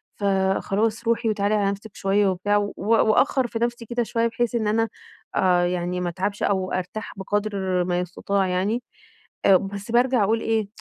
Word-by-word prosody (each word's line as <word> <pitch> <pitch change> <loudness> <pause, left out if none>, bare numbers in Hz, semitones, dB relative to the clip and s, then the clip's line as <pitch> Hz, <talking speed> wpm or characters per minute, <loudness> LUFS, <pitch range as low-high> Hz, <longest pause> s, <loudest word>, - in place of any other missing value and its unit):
فخلاص 200 +3 0
روحي 230 0 +1
وتعالي 210 0 +1
على 200 -1 +2
نفسك 200 +1 -9
شويّة 200 +1 +2
وبتاع، 205 +3 +1
و 205 0 -1
وأأخر 230 +4 +3
في 225 -1 -4
نفسي 235 0 -2
كده 240 +1 -1
شويّة 230 +1 0
بحيث 235 +1 -1
إن 220 -2 0
أنا 225 +1 +1 0.5
آآ، 180 -1 +3
يعني 180 0 -2
ما 175 - -1
أتعبش 195 +4 -3
أو 190 -2 0
أرتاح 185 +4 -4
بقدر 195 -2 -1
ما 175 0 0
يستطاع 190 +2 -1
يعني، 195 +7 0 0.6
آآ، 195 - +7
بس 200 +3 -6
بارجع 245 -2 +3
أقول 225 +3 +1
إيه؟ 220 -2 0
205 Hz, 170 wpm, -24 LUFS, 190-225 Hz, 0.6 s, آآ